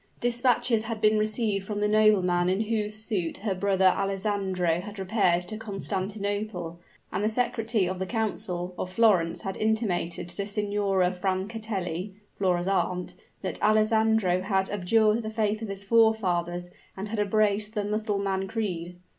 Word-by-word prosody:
Dispatches 240 -1 +2
had 225 -1 -4
been 215 0 +4
received 215 -2 0
from 210 -1 -3
the 210 - +2
nobleman 190 -5 +3
in 190 +3 +1
whose 215 -1 -1
suit 210 -6 -2
her 200 - +1
brother 190 0 +1
Alessandro 195 -3 0
had 205 +2 -9
repaired 185 -3 +2
to 195 +5 -5
Constantinople; 200 -3 -3 0.3
and 190 - -2
the 215 - +2
secretary 225 -3 0
of 185 0 -3
the 190 - -2
council 185 -5 -2
of 185 - -3
Florence 185 -6 +3
had 195 - -3
intimated 215 -7 -1
to 195 +3 -3
Signora 200 -3 +1
Francatelli 190 -1 -3 0.2
(Flora's 180 -2 0
aunt) 180 -2 0 0.3
that - - -4
Alessandro 215 -3 +3
had 190 0 0
abjured 215 +3 +2
the 220 - -4
faith 215 -1 -1
of 225 - -4
his 195 0 -6
forefathers 180 -6 +2 0.3
and 200 +2 -5
had 220 0 -3
embraced 210 +1 +1
the 205 -1 -1
Mussulman 200 -2 -1
creed. 180 -5 -3
205 Hz, 145 wpm, -27 LUFS, 185-215 Hz, 0.3 s, been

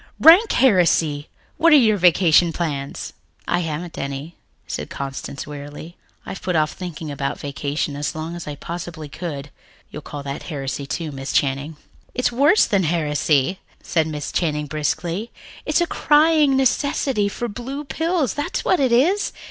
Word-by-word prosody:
"Rank 360 +8 +8
heresy! 170 - +3 0.3
What 335 +1 +5
are - - +10
your 225 -7 +5
vacation 175 -1 +5
plans?" 145 -5 -4 0.3
"I 175 - +1
haven't 165 0 -4
any," 140 +4 -5 0.3
said - - -5
Constance 135 0 -6
wearily. 145 +3 -9 0.3
"I've 195 - -7
put 180 -2 -1
off 155 -1 +2
thinking 165 -4 -7
about 140 0 -3
vacation 145 +1 -3
as 145 +2 -3
long 160 +2 -5
as 175 - -7
I 145 - -4
possibly 165 0 -7
could. 145 -2 -6 0.4
You'll 150 - -7
call 145 -1 -7
that 140 0 -5
heresy, 140 -2 -4
too, 160 +1 -3
Miss 135 0 -5
Channing." 140 +3 0 0.4
"It's 250 - +1
worse 285 - +4
than 195 -3 +1
heresy," 150 0 +1 0.2
said 160 -2 +1
Miss 150 -2 -4
Channing 150 -3 0
briskly. 165 +7 -2 0.4
"It's - - +2
a - - +3
crying 300 -3 +4
necessity 265 -4 +1
for 240 +4 -4
blue 255 +6 -6
pills, 320 -1 -1
that's 290 - -3
what 370 - +3
it 265 -3 +2
is. 335 +13 +3
165 Hz, 155 wpm, -21 LUFS, 145-240 Hz, 0.4 s, are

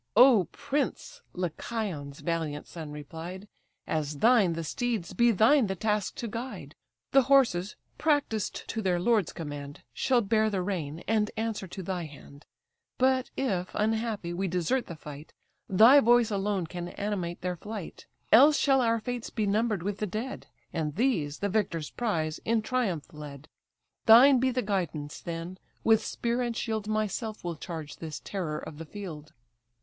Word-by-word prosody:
"O 240 -5 +7
prince! 295 - -3
(Lycaon's 175 -4 -4
valiant 160 -4 -2
son 160 -3 -8
replied) 165 +6 -8 0.4
As 150 -2 -2
thine 220 - +4
the 165 0 -4
steeds, 225 - -2
be 240 0 +4
thine 230 +4 +5
the 190 - -2
task 210 0 -1
to 235 - -4
guide. 210 - -6 0.4
The 270 - +6
horses, 210 -9 +3 0.2
practised 285 -9 0
to 225 - -2
their 180 -3 +1
lord's 210 -1 +2
command, 145 -3 -7
Shall 250 - +2
bear 220 +1 +2
the 195 -3 -1
rein, 165 -5 -3
and 215 -1 +2
answer 220 -3 -2
to 190 +2 -7
thy 180 -1 -3
hand; 145 -1 -14 0.5
But, 260 0 +2
if, 190 -9 -1
unhappy, 220 -4 -1
we 190 +2 -1
desert 180 +9 0
the 170 - -7
fight, 150 0 -10 0.4
Thy 225 +9 +8
voice 240 -3 +4
alone 200 -2 0
can 175 +1 -6
animate 185 -3 -3
their 180 -1 -2
flight; 210 0 -8 0.2
Else 285 +6 +8
shall 270 -2 +4
our 230 -1 +2
fates 245 +1 -4
be 215 - -1
number'd 210 -2 +1
with 200 +1 -3
the 210 - -1
dead, 220 +7 -5 0.3
And 155 -3 -2
these, 180 - +1
the 200 - -1
victor's 180 -7 -1
prize, 160 -10 -1
in 225 -1 +1
triumph 210 - -1
led. 150 -1 -9 0.6
Thine 250 +4 +8
be 260 +1 +2
the 255 0 -1
guidance, 170 -8 -2
then: 170 +2 -6 0.2
with 225 -1 +4
spear 235 +1 -1
and 240 -2 -2
shield 220 -2 -2
Myself 215 +1 -2
will 175 -1 -3
charge 160 -2 -7
this 160 -2 -6
terror 170 -6 -3
of 150 - -8
the 165 - -6
field." 160 -5 -8
200 Hz, 160 wpm, -28 LUFS, 165-230 Hz, 0.6 s, Thy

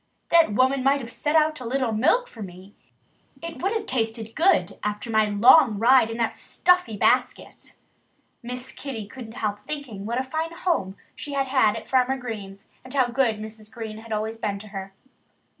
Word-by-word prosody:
"That 330 -10 +5
woman 260 +3 +2
might 275 +1 +3
have 235 -3 -8
set 295 +4 -1
out 310 -1 +3
a - - -7
little 250 0 -1
milk 325 - +2
for 225 - -12
me. 190 +1 -10 0.7
It 335 -1 -7
would 385 +3 0
have 440 -1 -2
tasted 225 - -2
good, 345 +2 +2
after 210 +3 -3
my 220 -1 +4
long 220 +3 +5
ride 235 +1 +5
in 225 - -5
that 230 -1 -1
stuffy 360 -12 +1
basket." - - 0 0.7
Miss 250 +1 -6
Kitty 245 -7 -6
couldn't 225 +1 -10
help 210 -3 -3
thinking 245 -10 -7
what 235 +2 -1
a - - 0
fine 320 +5 -3
home 320 - -1 0.2
she 290 - -6
had 275 -1 +1
had 260 -5 +3
at 225 - -7
Farmer 260 0 +2
Green's 205 -5 -8
and 255 - -12
how 255 -3 +3
good 240 -3 +1
Mrs. 215 0 -8
Green 220 -3 -7
had 225 0 -12
always 220 +1 -2
been 205 -3 -2
to 210 +1 -11
her. 195 -1 -7
235 Hz, 190 wpm, -24 LUFS, 215-275 Hz, 0.7 s, That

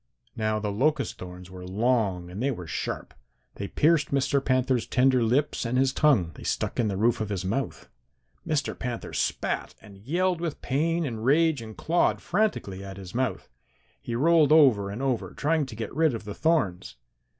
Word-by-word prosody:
"Now 110 -1 0
the 105 -1 -2
locust 145 +9 0
thorns 90 0 -9
were 90 -1 -9
long 95 -3 0
and 95 +5 -6
they 135 - +1
were 90 -10 -4
sharp. - - -4 0.4
They 100 - -4
pierced 150 +3 +2
Mr. 140 0 +1
Panther's 130 -2 +1
tender 130 0 +3
lips 130 +6 +1
and 120 +1 -1
his 130 0 +2
tongue. 125 - +3
They - - -13
stuck - - -2
in 115 - +2
the 100 -2 -2
roof 115 +2 +2
of 110 - -2
his 95 -3 -3
mouth. 115 +8 -3 0.6
Mr. 155 -4 -1
Panther 125 -3 -5
spat - - -2
and 100 -2 -15
yelled 175 - 0
with 170 -4 -3
pain 165 +5 0
and 115 -5 -4
rage 150 +1 +3
and 110 -1 -10
clawed 170 +2 +1
frantically 175 - -1
at 95 -1 -8
his 95 -2 -9
mouth. 130 0 -2 0.5
He 115 - -4
rolled 155 +3 +4
over 130 -11 +5
and 110 +7 -5
over 130 -4 -1
trying 155 -1 +1
to 120 - -9
get 110 0 -5
rid 155 -4 +2
of 110 - -6
the 105 -1 -6
thorns. 130 - 0
125 Hz, 185 wpm, -26 LUFS, 105-150 Hz, 0.6 s, over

